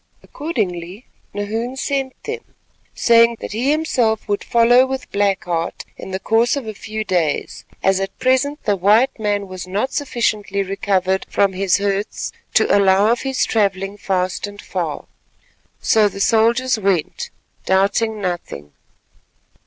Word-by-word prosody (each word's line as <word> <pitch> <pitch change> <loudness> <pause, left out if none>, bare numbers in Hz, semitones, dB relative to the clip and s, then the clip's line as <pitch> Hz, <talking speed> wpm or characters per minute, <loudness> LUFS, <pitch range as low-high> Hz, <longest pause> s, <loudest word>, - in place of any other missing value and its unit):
Accordingly 200 - -4 0.3
Nahoon 225 +5 -3
sent 270 -1 -3
them, 450 +1 -7 0.4
saying 230 0 +5
that - - -6
he 235 +6 0
himself 255 -8 +1
would 205 -1 -1
follow 240 +1 +5
with 265 0 -5
Black 200 -1 +1
Heart 170 -1 -3
in - - -9
the 190 0 -3
course 225 +5 +2
of 280 -4 -4
a 220 - -5
few 215 +1 -5
days, 175 -6 -1 0.2
as 195 0 +3
at 195 0 -4
present 265 +3 +1
the 205 - +2
white 215 +8 +3
man 205 -2 -1
was 185 -1 -7
not 205 +8 -2
sufficiently 215 -7 -1
recovered 190 -1 0
from 200 -1 +2
his 190 0 +2
hurts 200 +1 -2 0.2
to - - +4
allow 200 +2 +4
of 240 - 0
his 270 -1 0
travelling 195 -2 0
fast 185 -1 -1
and 205 0 -11
far. - - -4 0.8
So 215 -2 +4
the 195 - -9
soldiers 230 +3 +2
went, 190 -6 -1 0.4
doubting 200 +3 +2
nothing. 175 - -5
205 Hz, 145 wpm, -19 LUFS, 195-235 Hz, 0.8 s, saying